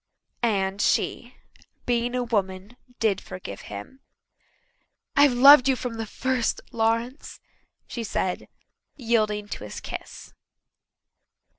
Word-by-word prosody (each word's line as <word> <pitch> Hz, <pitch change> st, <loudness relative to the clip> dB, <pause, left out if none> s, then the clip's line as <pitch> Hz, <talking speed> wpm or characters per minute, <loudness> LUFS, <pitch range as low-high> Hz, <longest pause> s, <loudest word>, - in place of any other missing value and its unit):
And 200 Hz, -4 st, 0 dB
she, -, -, 0 dB, 0.5 s
being 240 Hz, 0 st, 0 dB
a 250 Hz, -, 0 dB
woman, 200 Hz, -2 st, -2 dB, 0.2 s
did 210 Hz, -4 st, +1 dB
forgive 140 Hz, -, -8 dB
him. 105 Hz, -, -9 dB, 1.2 s
"I've 285 Hz, -2 st, +6 dB
loved 275 Hz, +2 st, +8 dB
you 265 Hz, -, +4 dB
from 240 Hz, -2 st, -5 dB
the 225 Hz, -1 st, -4 dB
first, 255 Hz, +1 st, -1 dB
Lawrence," 230 Hz, +4 st, -1 dB, 0.5 s
she 235 Hz, -, -5 dB
said, 190 Hz, -3 st, -2 dB, 0.5 s
yielding 215 Hz, -5 st, 0 dB
to -, -, -6 dB
his 105 Hz, -, -7 dB
kiss. -, -, -8 dB
230 Hz, 110 wpm, -25 LUFS, 200-245 Hz, 1.2 s, loved